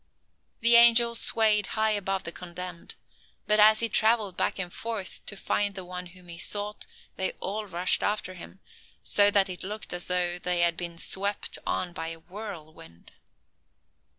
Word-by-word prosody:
The 235 +1 +6
angel 235 0 +6
swayed 215 -3 +5
high 220 0 +2
above 195 -2 -2
the 170 - -5
condemned; 180 0 -7 0.5
but 210 0 +2
as 215 +1 +6
he 230 - +1
traveled 220 -3 +2
back - - -1
and 180 -2 -5
forth, 225 -4 -4
to 205 - -5
find 205 0 -2
the 190 -2 -8
one 180 0 -8
whom 180 0 -15
he 170 0 -9
sought, 205 +3 -3 0.3
they 190 - -1
all 210 +2 -5
rushed 180 0 +3
after 205 -3 -2
him, 185 +2 -12 0.4
so 205 0 +4
that 200 -1 +3
it 180 -1 -7
looked 210 +1 -6
as 180 0 -3
though 180 -1 0
they 180 -1 -1
had 170 -1 +2
been 170 0 -6
swept 200 +4 -2
on 175 -1 -2
by 165 - -5
a 165 0 -7
whirlwind. 160 - -11
190 Hz, 170 wpm, -26 LUFS, 175-210 Hz, 0.5 s, The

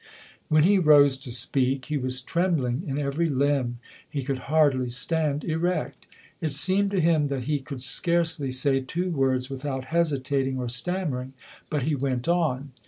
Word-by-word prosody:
When 155 -1 +4
he 195 +3 +4
rose 145 -4 +6
to 130 -2 -8
speak, 130 +2 0
he 150 - -2
was 130 0 -1
trembling 155 -5 0
in 135 0 -2
every 145 +3 0
limb. 135 -3 0 0.3
He 140 -2 -3
could 135 0 -2
hardly 145 -5 +3
stand 150 +3 0
erect. 170 +3 -2 0.3
It 155 -4 -1
seemed 190 +7 +2
to 195 -1 0
him 160 -3 +3
that 135 -3 -3
he 145 +3 -1
could 135 -1 -8
scarcely 165 -1 0
say 135 +1 +2
two 175 +7 -3
words 130 -3 0
without 135 -1 -4
hesitating 135 -5 0
or 125 -1 -3
stammering, 130 -1 -2 0.4
but 150 -4 -1
he 155 +3 0
went 130 -2 -2
on. 150 -6 0
140 Hz, 165 wpm, -25 LUFS, 130-160 Hz, 0.4 s, rose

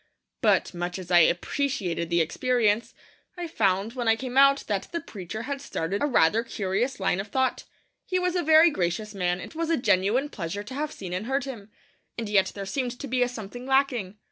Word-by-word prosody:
But, - - +2
much 175 +1 -3
as 185 -1 -8
I 175 - +7
appreciated 175 - 0
the 170 -1 +3
experience, 230 +5 +1 0.4
I 350 - -4
found, 200 - 0
when 245 -2 -3
I 225 - +5
came 250 +2 -6
out, 275 +1 +6
that 200 -3 -2
the 340 - -2
preacher 210 - -7
had 280 +2 -4
started 190 -4 -3
a 290 - +2
rather 220 - +3
curious 220 +3 -2
line 190 -1 +1
of 195 - -4
thought. 260 +4 0 0.4
He 370 - 0
was 360 0 0
a 355 - +2
very 320 +1 +6
gracious 190 - -2
man; 180 -2 -1
it - - -9
was 330 0 -2
a 330 - +2
genuine 240 +4 +2
pleasure 200 - -5
to 255 - -9
have 295 +2 -3
seen 180 -3 -7
and 185 +5 -3
heard 270 +1 0
him. 235 -7 -8 0.5
And 230 -2 -3
yet 195 -2 +3
there 200 -1 -5
seemed 245 +3 -3
to 280 - -5
be 255 0 0
a 245 - +3
something 245 +2 -8
lacking. 255 -8 +1
225 Hz, 210 wpm, -26 LUFS, 190-270 Hz, 0.5 s, I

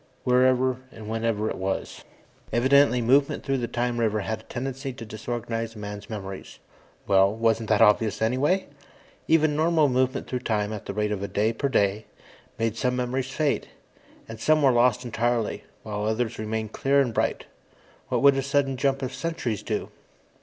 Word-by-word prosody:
Wherever 130 0 +3
and 110 -2 -10
whenever 110 -1 -1
it - - -3
was. 95 0 -3 0.5
Evidently 130 0 +4
movement 135 +4 +3
through 135 -1 0
the 120 - -2
time 120 0 -2
river 110 -2 +1
had 110 +2 -3
a - - -16
tendency 135 +2 -4
to 115 - -9
disorganize 115 +1 -4
a - - -11
man's 105 -1 -7
memories. 95 -3 -7 0.5
Well, 95 0 +4
wasn't 115 -1 +1
that 110 -2 +5
obvious 105 0 +3
anyway? 130 +12 +1 0.6
Even 155 -2 +3
normal 160 -1 +3
movement 130 +1 0
through 125 - -3
time, 105 -2 -1
at 105 - -7
the 100 - -3
rate 105 0 0
of 100 -2 -2
a 100 - -2
day 110 +3 0
per 140 +5 -1
day, 105 -3 +1 0.5
made 115 -1 -1
some 125 +1 0
memories 125 +1 -2
fade. 150 +1 -1 0.6
And 115 -1 -9
some 155 +4 +3
were 135 - +6
lost 125 +1 +3
entirely, 120 -1 -1 0.2
while 105 -1 -3
others 110 +1 -1
remained 110 0 -3
clear 140 +1 +2
and 125 -4 +1
bright. - - -1 0.6
What - - 0
would 140 -1 +7
a - - +1
sudden 140 -1 0
jump 135 +1 0
of 130 0 -3
centuries 130 - -3
do? - - -3
120 Hz, 175 wpm, -25 LUFS, 110-135 Hz, 0.6 s, would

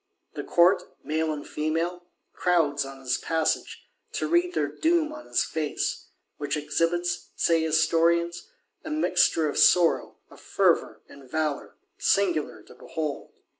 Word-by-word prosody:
The - - -5
Court, 180 +2 +4 0.2
male 160 +1 -1
and 150 -1 -6
female, 165 +3 -2 0.3
crowds 160 -5 +1
on 135 0 -10
his 130 -1 -1
passage, 160 -1 -1 0.3
to - - -2
read 350 +1 +1
their - - +1
doom 320 -2 0
on 305 0 -10
his - - +1
face; 155 -2 -3 0.3
which 145 +1 -2
exhibits, 165 +4 -1
say 165 -1 +2
Historians, 165 +2 +1 0.4
a 315 - -7
mixture 180 - +2
"of 145 - -2
sorrow, 175 -2 +4
of - - -15
fervour - - +1
and 140 -2 -15
valour," 155 0 -2 0.2
singular 175 -7 +1
to - - -16
behold. 155 -3 -5
165 Hz, 135 wpm, -26 LUFS, 155-175 Hz, 0.4 s, Court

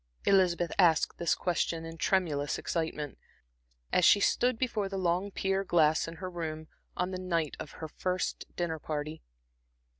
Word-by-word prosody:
Elizabeth 180 -3 +3
asked 165 -4 +4
this 170 - +2
question 170 -2 -1
in 165 0 -7
tremulous 160 -5 0
excitement, 160 -4 -3 0.7
as 180 - +4
she 205 - +7
stood 245 +4 +2
before 220 -5 -1
the 195 - -4
long 180 +2 0
pier 195 0 0
glass 160 -4 +3
in 165 - -7
her 185 +2 -6
room 160 -2 -5 0.3
on 180 +1 0
the 185 - -4
night 170 -5 -1
of 145 - -7
her 160 - -6
first 185 +4 -2
dinner 165 -2 -2
party. 155 +1 -4
170 Hz, 155 wpm, -30 LUFS, 160-185 Hz, 0.7 s, she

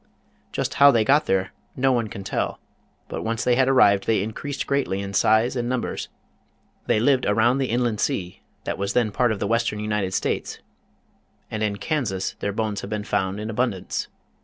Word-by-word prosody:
Just - - -2
how 140 - +10
they 115 -5 +3
got 145 +5 +3
here 95 -1 +1 0.2
no 135 +1 +2
one 120 -3 +1
can 100 -1 -8
tell, - - -2 0.5
but - - -5
once 115 0 -2
they 125 - +3
had 130 +1 +3
arrived, 100 -7 +4
they 110 -4 +2
increased 135 +6 -4
greatly 140 -9 0
in 100 0 -5
size 110 +6 +3
and 120 -1 -1
num 125 -1 0
bers. - - -4 0.8
They - - +3
lived 130 +2 +2
around 115 +5 +3
the 135 - 0
inland 120 -2 0
sea 90 -1 -2 0.2
that - - -4
was 100 0 -1
then 115 -4 +2
part 120 +3 +2
of 110 - -1
the - - -1
western 115 0 0
United 105 -3 -1
States, - - -2 0.9
and 110 - -3
in 105 -1 0
Kansas 100 -4 -2
their 100 - -1
bones 105 -1 -2
have 100 - -7
been 105 -1 -3
found 95 0 -1
in 110 +1 -4
abundance. 115 -4 -2
110 Hz, 195 wpm, -24 LUFS, 100-125 Hz, 0.9 s, how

